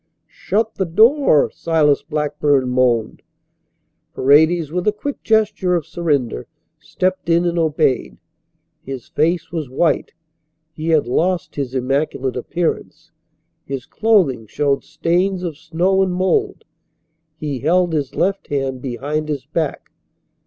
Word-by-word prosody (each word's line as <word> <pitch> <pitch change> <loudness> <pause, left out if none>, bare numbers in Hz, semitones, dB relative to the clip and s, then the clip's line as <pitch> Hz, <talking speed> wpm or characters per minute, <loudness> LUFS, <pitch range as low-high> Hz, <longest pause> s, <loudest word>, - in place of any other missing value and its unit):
"Shut 225 - -2
the 190 - -1
door," 220 - +4
Silas 155 -3 +2
Blackburn 150 -3 0
moaned. 125 -3 +1 0.9
Paredes, 155 +3 +4
with 180 +3 -2
a - - +5
quick 275 +7 -6
gesture 210 -4 +1
of 165 -4 -1
surrender, 140 - -1 0.3
stepped 185 -1 -2
in 170 +1 +3
and 175 0 0
obeyed. 150 - 0 0.6
His 135 -2 -7
face 165 +2 0
was 160 -6 -4
white. 150 +5 0 0.6
He 160 0 -6
had 155 -5 +3
lost 175 +8 -1
his 135 -2 -4
immaculate 135 0 -1
appearance. 165 +7 -3 0.5
His 135 -2 -5
clothing 175 - +1
showed 140 +3 0
stains 180 +2 0
of 170 -4 -3
snow 175 +5 0
and 190 -1 +1
mould. 380 - 0 0.7
He 145 -4 -4
held 175 +5 +2
his 145 -4 -2
left 195 +1 0
hand 135 -2 -2
behind 145 +4 -3
his 140 -3 -3
back. 155 0 -3
155 Hz, 125 wpm, -19 LUFS, 140-180 Hz, 0.9 s, a